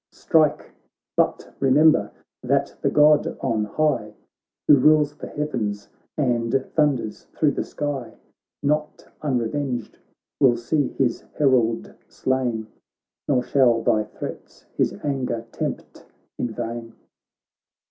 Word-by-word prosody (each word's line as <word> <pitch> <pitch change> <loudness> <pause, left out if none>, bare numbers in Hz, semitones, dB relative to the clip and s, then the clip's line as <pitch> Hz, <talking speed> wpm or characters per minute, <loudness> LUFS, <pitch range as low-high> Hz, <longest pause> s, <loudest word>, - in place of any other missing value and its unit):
Strike! 155 -2 +1 0.4
but - - 0
remember 150 +4 +4 0.3
that - - 0
the - - +2
God 150 0 +4
on 115 -5 0
high 105 -3 -1 0.5
Who 145 - +9
rules 150 +1 +4
the - - -8
heavens, 105 -9 -3 0.3
and 120 -5 +1 0.2
thunders 140 -8 0
thro' 150 -2 +3
the - - -2
sky, 145 -5 -4 0.5
Not 150 +1 -1 0.2
unrevenged 125 -2 -2 0.4
will 120 -3 +5
see 140 +4 0
his 125 -4 0 0.2
herald 125 -6 +2
slain, 125 -4 -1 0.6
Nor 130 -3 +2
shall 120 -5 +3
thy 110 -1 +2
threats - - -9
his - - +1
anger 130 -5 -2
tempt - - -5 0.4
in 120 - -1
vain.' 115 +1 -5
130 Hz, 110 wpm, -23 LUFS, 115-150 Hz, 0.6 s, Who